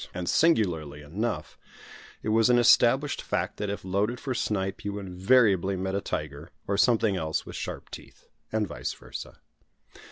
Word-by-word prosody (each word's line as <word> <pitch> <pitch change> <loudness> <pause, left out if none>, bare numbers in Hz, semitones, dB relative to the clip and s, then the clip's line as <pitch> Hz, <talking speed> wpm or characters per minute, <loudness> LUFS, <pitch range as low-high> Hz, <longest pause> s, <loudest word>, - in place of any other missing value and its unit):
And, 90 -1 -4
singularly 85 - +2
enough, 105 +9 -4 0.6
it - - -2
was 115 +2 +4
an 120 - +5
established 130 +4 +4
fact - - -2
that 105 -1 -3
if 100 -1 -5
loaded 100 +6 0
for 135 -3 -3
snipe 95 -5 -2
you 100 0 -3
invariably 95 0 +2
met 95 +1 -3
a 100 - 0
tiger, 75 -1 -5 0.2
or 100 - 0
something 110 -1 +3
else 80 -2 -2
with - - -9
sharp - - -6
teeth, - - -12 0.2
and 110 -1 +1
vice 65 -7 -4
versa. - - -9
100 Hz, 160 wpm, -27 LUFS, 90-115 Hz, 0.6 s, an